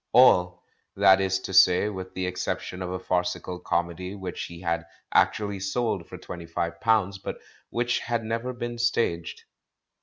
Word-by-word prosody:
All, 90 -8 +5 0.3
that 95 0 +6
is 95 0 +1
to 95 - -6
say, 90 +1 +6
with 95 -3 -6
the 95 - -1
exception 90 0 -3
of 90 - -3
a 95 - -2
farcical 90 0 -2
comedy 85 +3 -2
which 95 -3 -5
he 85 0 -10
had 85 -1 -1 0.3
actually 100 -2 +2
sold 100 -2 -1
for 90 - -8
twenty 85 -1 -8
five 85 0 -3
pounds 105 -4 +2
but - - -5 0.3
which 120 0 0
had 120 -1 -2
never 115 +3 -2
been 120 -1 -5
staged. 115 -8 0
95 Hz, 160 wpm, -26 LUFS, 90-110 Hz, 0.3 s, that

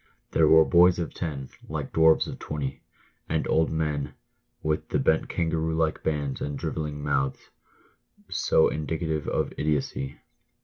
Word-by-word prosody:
There - - +4
were 80 0 +7
boys 90 +1 +5
of 85 -2 -3
ten, 70 -6 -4 0.2
like - - -4
dwarfs 80 0 +5
of - - -7
twenty; 70 -3 -4 0.5
and - - 0
old 80 0 +2
men, 75 -3 -2 0.5
with 75 0 -1
the - - +1
bent 80 - +2
kangaroo 80 -1 -1
like 80 -1 0
hands 70 -3 -2
and 70 -1 -3
drivelling 75 -2 -4
mouth, 70 -2 -1 0.8
so 80 - +3
indicative 80 0 -2
of - - -1
idiocy. 70 -2 -2
80 Hz, 140 wpm, -26 LUFS, 75-80 Hz, 0.8 s, were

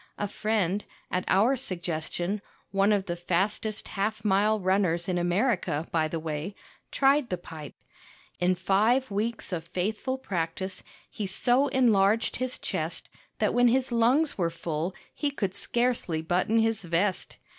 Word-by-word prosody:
A 205 - -1
friend, 205 -2 0 0.3
at 180 - -1
our 220 +8 +4
suggestion 175 -2 -2 0.3
one 195 +1 +3
of 200 -2 +2
the 175 - -3
fastest 195 +5 -1
half 210 +1 -2
mile 210 +2 +3
runners 185 -3 +1
in 180 -2 0
America, 175 - 0
by 160 -2 +2
the 165 +1 -3
way 160 +4 -4 0.3
tried 275 -1 +3
the 180 - -1
pipe. 155 -4 -10 0.6
In 180 +1 +2
five 215 +7 +2
weeks 215 0 -1
of 165 -2 -2
faithful 210 +9 -2
practice 185 -4 -3 0.3
he 210 - -5
so 245 +8 +2
enlarged 225 -5 +3
his 255 0 -1
chest - - -3 0.3
that - - +1
when 245 0 +5
his 255 +2 +2
lungs 245 +5 +2
were 170 -2 +2
full 165 +1 -3 0.2
he 295 - -1
could 200 -9 -2
scarcely 200 -6 +1
button 180 +6 +1
his 225 -2 +2
vest. 180 +3 -1
195 Hz, 145 wpm, -27 LUFS, 175-225 Hz, 0.6 s, when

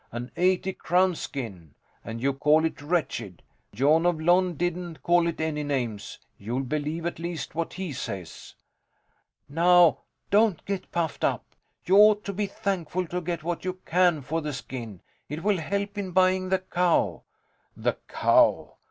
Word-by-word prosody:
An 120 +2 -6
eighty 185 +1 +1
crown 180 +2 +2
skin! 100 - -7 0.3
And 115 +1 -6
you 140 0 +2
call 150 +3 +3
it 160 - -3
wretched! 145 - -2 0.3
Jon 150 +9 +3
of 175 -3 +1
Lon 175 +2 +3
didn't 175 0 -3
call 175 0 +3
it 170 - -3
any 160 -1 -1
names. 125 -8 -3 0.2
You'll 120 +6 -3
believe 150 +4 -3
at 170 - -3
least 170 -1 -5
what 165 +1 -3
he 185 -5 -5
says. 95 -9 -7 0.9
Now, 170 +2 +5 0.3
don't 210 -4 +3
get 195 -2 -4
puffed 165 -3 -2
up. - - 0 0.4
You 190 +2 +4
ought 210 0 +6
to 200 - -4
be 205 +1 -1
thankful 185 -3 -2
to 180 +1 -2
get 170 -1 -4
what 170 +1 -3
you 185 0 -2
can 175 -4 +2
for 160 +5 -2
the 150 -1 -4
skin. 120 -6 -7 0.3
It 150 +3 -5
will 205 -1 +2
help 200 +5 -3
in 190 -3 -4
buying 185 0 +3
the 190 - +3
cow. 180 -2 0 0.6
The - - -1
cow? - - +3
170 Hz, 160 wpm, -26 LUFS, 145-185 Hz, 0.9 s, ought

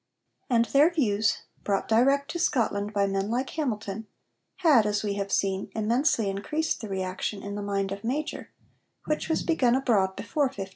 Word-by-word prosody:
And 235 -2 +3
their 285 +6 +5
views, 220 -9 +1 0.2
brought 200 -1 0
direct 275 +6 +3
to 345 - -4
Scotland 230 - 0
by 200 -2 +2
men 195 +1 -1
like 250 +3 -1
Hamilton, 220 -7 -3 0.5
had, 280 - +4
as 210 0 0
we 205 -1 -1
have 200 0 -3
seen, 195 -1 0
immensely 230 +1 +1
increased 300 +13 -2
the 215 - -6
reaction 190 +1 -3
in 200 - -5
the 205 - -4
mind 200 -1 -1
of 200 0 -5
Major, 285 +7 -3 0.6
which 305 +1 -2
was 320 - +1
begun 255 -8 +2
abroad 205 -8 +2
before 255 +8 0
1518. 225 -8 -4
220 Hz, 175 wpm, -27 LUFS, 200-275 Hz, 0.6 s, their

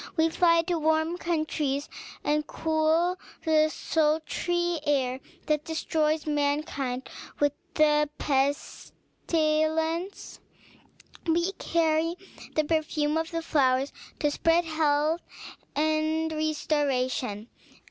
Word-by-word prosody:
We 320 0 +4
fly 335 0 +4
to 345 -1 -1
warm 315 +2 +1
countries, 310 -4 -1 0.4
and 300 0 0
cool 320 +3 +1 0.3
the 310 -1 +4
sultry 325 +3 0
air 265 -3 +1 0.3
that 300 -1 +1
destroys 315 -1 0
mankind 285 -3 -1 0.3
with 290 -1 +3 0.2
the 300 -1 +4
pestilence. 315 +4 -1 0.9
We 340 +3 +2
carry 330 0 +1 0.4
the 310 - +3
perfume 305 -1 0
of 325 +1 -1
the 330 -1 -3
flowers 270 -3 +2 0.3
to 295 -2 +2
spread 330 +3 +2
health 310 +1 +1 0.5
and 315 +1 +1
restoration. 275 -7 -1
310 Hz, 95 wpm, -27 LUFS, 295-325 Hz, 0.9 s, We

